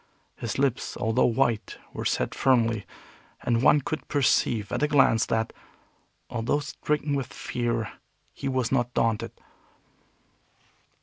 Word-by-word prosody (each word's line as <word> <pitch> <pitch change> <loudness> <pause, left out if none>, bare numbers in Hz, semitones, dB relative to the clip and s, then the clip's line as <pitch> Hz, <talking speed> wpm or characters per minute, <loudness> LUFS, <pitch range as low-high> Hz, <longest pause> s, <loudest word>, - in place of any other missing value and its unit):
His 115 -3 -4
lips, 135 -3 0
although 110 +3 +2
white, 120 -2 0 0.2
were - - -5
set - - 0
firmly, 115 -5 +2 0.6
and 115 -1 +1
one 145 +3 +5
could 155 +4 -4
perceive 115 -6 +2
at - - -1
a 150 - +3
glance 135 -6 +4
that, 110 0 0 0.7
although 115 +4 0
stricken 150 0 -2
with 135 -2 -2
fear, 115 -2 -2 0.4
he - - -5
was 130 -3 0
not 120 -2 0
daunted. 115 -2 +1
120 Hz, 125 wpm, -26 LUFS, 115-135 Hz, 0.7 s, one